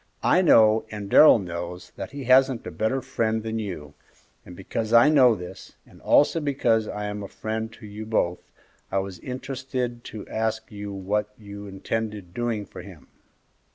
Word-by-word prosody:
I 185 - +4
know, 110 -10 +5
and 105 -2 -7
Darrell 155 - +8
knows, 90 -2 -6
that - - -6
he 140 0 -7
hasn't 130 -1 +4
a - - -5
better 125 +4 -1
friend 110 -4 -1
than 110 0 -3
you, 90 -9 -6 0.5
and 90 - -12
because 110 +4 -4
I 120 +6 +7
know 130 -6 +6
this, 90 -2 -10
and - - -19
also 145 +3 +4
because 120 -7 +1
I 105 0 -4
am 105 0 -4
a 100 - -6
friend 110 +2 -4
to 110 - -13
you 105 +1 -8
both, 90 -5 0 0.5
I 95 - 0
was 95 -2 -3
interested 125 -2 -4
to 110 - -8
ask 110 0 -2
you 105 -1 -6
what 100 +2 -2
you 100 -1 -9
intended 100 -1 -4
doing 115 -2 -2
for 90 - -10
him." 90 -4 -14
110 Hz, 175 wpm, -25 LUFS, 100-120 Hz, 0.5 s, Darrell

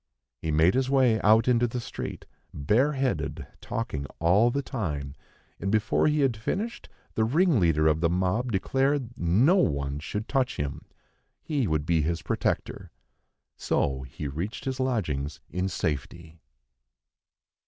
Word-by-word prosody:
He 80 - -4
made 80 +4 +4
his 130 0 +1
way 130 -5 +3
out 110 +2 +5
into 120 -1 +3
the 125 +2 -4
street 120 - -6 0.3
bare 115 - +2
headed, 135 -2 -2 0.2
talking 75 - -4
all 95 +8 +4
the 140 +3 -1
time; 75 - -4 0.5
and 100 - -2
before 110 +5 +2
he 150 0 +2
had 135 -4 +2
finished, 200 - -4 0.2
the 110 - +1
ringleader 110 - +3
of 80 0 +3
the 85 - +3
mob 95 +8 0
declared 135 +5 0
no 115 - +3
one 70 - 0
should 105 +8 -4
touch 130 -3 0
him, 70 -1 -4 0.6
he 140 -7 0
would 75 -3 0
be 80 -1 +2
his 80 +1 -2
protector. - - -2 0.7
So 65 -1 0
he 65 +3 -6
reached 85 +10 -5
his 135 0 -3
lodgings 80 - -1
in 90 +1 -1
safety. 80 0 -4
105 Hz, 145 wpm, -27 LUFS, 80-130 Hz, 0.7 s, out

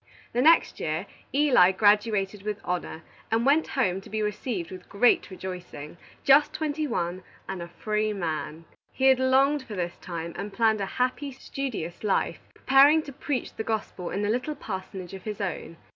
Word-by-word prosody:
The 245 - +2
next 325 +5 +4
year, - - -2 0.3
Eli 260 -11 +5
graduated 205 -1 +2
with 210 0 -4
honor, 175 -2 -3 0.3
and 225 +2 +1
went 295 +4 +4
home, 190 -7 +1
to - - -14
be 215 0 -1
received 210 -4 -3
with 185 -1 -10
great 235 +5 +3
rejoicing, 180 -5 -8 0.3
just 280 +2 +5
twenty 305 -1 -2
one, 180 -6 -2 0.3
and 190 -2 -5
a 170 - -6
free 215 +4 -1
man. 165 -4 -4 0.3
He 265 - -1
had 265 -1 +6
longed 270 +3 +3
for 230 -5 -8
this 175 -2 -3
time, 170 -2 -6
and 200 +2 -5
planned 220 0 +2
a 195 - -1
happy, 255 +3 0
studious 250 -10 -5
life, 205 -2 0 0.2
preparing 285 +4 +5
to 280 - -9
preach 285 -2 -3
the - - -4
gospel 215 -5 -3
in 205 +2 -2
a - - 0
little 250 +6 -2
parsonage 190 -4 -6
of 190 - -7
his 215 0 -4
own. 180 -3 -4
210 Hz, 175 wpm, -27 LUFS, 185-260 Hz, 0.3 s, had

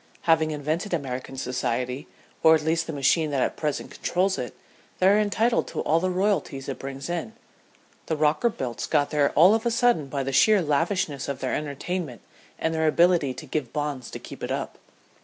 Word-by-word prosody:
Having 160 -1 +3
invented 155 +6 -2
American 135 -3 -5
society, 125 +1 -2 0.3
or 160 0 +7
at 155 - -1
least 165 +1 0
the - - -3
machine 150 +2 +2
that 140 -3 +1
at - - -1
present 150 -2 -3
controls 185 +2 0
it, 120 -3 -5 0.4
they 185 - +3
are 205 +2 +5
entitled 220 +3 +1
to - - -4
all 160 +2 +2
the 185 +2 0
royalties 185 -8 -1
it 135 - -5
brings 135 0 -6
in. 175 +5 -3 0.7
The 160 - -1
Rockerbilts 150 - 0
got 145 - +2
there 145 -2 +3
all 180 +7 +7
of 225 0 +1
a 240 - +1
sudden 235 - +2
by 135 0 -2
the 135 +1 -3
sheer 210 +9 +5
lavishness 155 -3 0
of 140 - -2
their 130 - -2
entertainment 150 - -4 0.4
and 160 - -1
their 160 0 +1
ability 165 -4 +3
to - - -8
give 140 -7 -3
bonds 145 -4 -3
to - - -6
keep - - -11
it - - -3
up. - - -4
155 Hz, 195 wpm, -25 LUFS, 135-180 Hz, 0.7 s, or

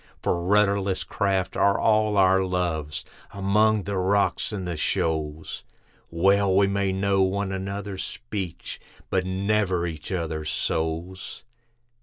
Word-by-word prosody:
For 85 - 0
rudderless 100 0 +2
craft 95 -3 -1
are 100 0 +3
all 110 -1 +3
our 95 0 +5
loves, 85 -5 -2 0.3
among 105 +2 +2
the 100 -1 -2
rocks 100 +4 +1
and 95 -4 -4
the 85 - -2
shoals, 80 0 -2 0.5
Well 95 +3 +3
we 100 +1 +5
may 100 0 0
know 95 0 +1
one 95 +1 0
another's 95 0 -4
speech, 100 -7 -6 0.3
but 95 -1 +1
never 95 -2 +1
each 80 -1 -6
other's 80 -4 -2
souls. 80 +5 -3
95 Hz, 125 wpm, -25 LUFS, 90-100 Hz, 0.5 s, our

